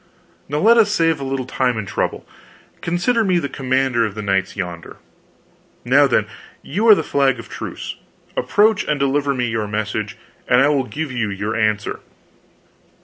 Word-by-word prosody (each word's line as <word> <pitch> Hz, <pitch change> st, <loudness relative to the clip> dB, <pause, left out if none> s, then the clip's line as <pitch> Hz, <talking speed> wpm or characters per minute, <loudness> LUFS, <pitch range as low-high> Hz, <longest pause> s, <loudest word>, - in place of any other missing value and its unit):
Now 145 Hz, -, -1 dB
let 225 Hz, +8 st, +5 dB
us 210 Hz, -2 st, +4 dB
save 165 Hz, -6 st, +2 dB
a -, -, -5 dB
little 135 Hz, -1 st, -3 dB
time 125 Hz, -2 st, 0 dB
and 105 Hz, -2 st, -4 dB
trouble. -, -, -3 dB, 0.5 s
Consider 180 Hz, +7 st, +1 dB
me 185 Hz, -3 st, +2 dB
the 165 Hz, -, -1 dB
commander 130 Hz, -2 st, 0 dB
of 105 Hz, -3 st, -3 dB
the 105 Hz, -, -5 dB
knights 95 Hz, -2 st, 0 dB
yonder. 90 Hz, -4 st, -6 dB, 0.9 s
Now, -, -, +5 dB
then, -, -, +2 dB, 0.4 s
you 205 Hz, +10 st, -1 dB
are 215 Hz, -, +9 dB
the 160 Hz, -, -1 dB
flag 135 Hz, -3 st, +1 dB
of 115 Hz, -, -10 dB
truce; -, -, -6 dB, 0.4 s
approach 210 Hz, +1 st, +2 dB
and 150 Hz, -1 st, -1 dB
deliver 140 Hz, 0 st, +1 dB
me 125 Hz, -1 st, 0 dB
your 115 Hz, -2 st, -2 dB
message, 105 Hz, 0 st, -3 dB, 0.3 s
and 125 Hz, -, +4 dB
I 140 Hz, +2 st, +4 dB
will 140 Hz, -3 st, +1 dB
give 150 Hz, +2 st, -5 dB
you 120 Hz, -4 st, -1 dB
your 100 Hz, +2 st, -3 dB
answer." 110 Hz, -2 st, 0 dB
130 Hz, 175 wpm, -20 LUFS, 110-160 Hz, 0.9 s, are